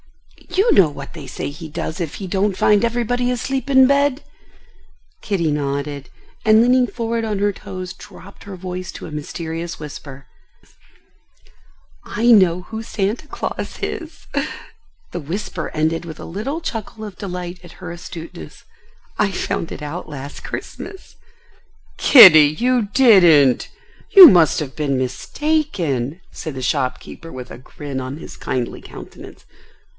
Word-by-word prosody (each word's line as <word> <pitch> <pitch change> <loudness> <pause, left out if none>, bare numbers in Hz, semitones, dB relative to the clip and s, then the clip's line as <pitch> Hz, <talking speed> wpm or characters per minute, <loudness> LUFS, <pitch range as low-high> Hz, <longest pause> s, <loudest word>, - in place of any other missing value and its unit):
You 385 +6 +2
know 180 -6 +5
what 140 -1 -9
they 150 -5 -9
say 130 - -5
he 155 +2 -9
does 160 +3 -5
if 160 -4 -4
he 195 - -6
don't 195 +1 0
find 210 0 +3
everybody 245 +1 0
asleep 260 +3 -2
in 265 -1 +6
bed?" 280 0 +2 1.0
Kitty 170 -7 -1
nodded, 140 -1 -3 0.3
and 220 0 +5
leaning 250 +1 +4
forward 230 -1 -3
on 215 -2 -2
her 205 +1 +1
toes, 185 -1 -7
dropped 195 +1 -14
her 200 -1 -8
voice 185 0 -6
to - - -9
a - - -9
mysterious 165 +3 -5
whisper: 140 -2 -9 1.8
"I 225 - -3
know 180 -5 +5
who 220 +3 -7
Santa 220 +6 -3
Claus - - -5
is." 330 -2 -6 0.9
The 175 - -4
whisper 170 +7 -5
ended 160 +2 -1
with 160 -2 -9
a - - -8
little 250 - -4
chuckle 220 -6 -6
of 205 -3 -10
delight 180 -2 -6
at 175 - -13
her 170 - -9
astuteness. 170 - -10 0.6
"I 210 -2 +2
found 170 - -3
it - - -7
out 155 +3 -6
last 140 -1 -8
Christmas." 385 - -8 0.8
"Kitty, 185 - +9
you 245 -4 +1
didn't! 175 - +5 0.4
You 380 -3 +12
must 175 - +5
have 140 -4 -5
been 140 -3 -1
mistaken?" 165 - -2
said 155 -5 -7
the 130 - -5
shopkeeper 130 +6 -3
with 125 -1 -9
a - - -9
grin 135 +1 -7
on 130 +3 -6
his - - -10
kindly 125 -2 -4
countenance. - - -12
180 Hz, 145 wpm, -20 LUFS, 150-225 Hz, 1.8 s, You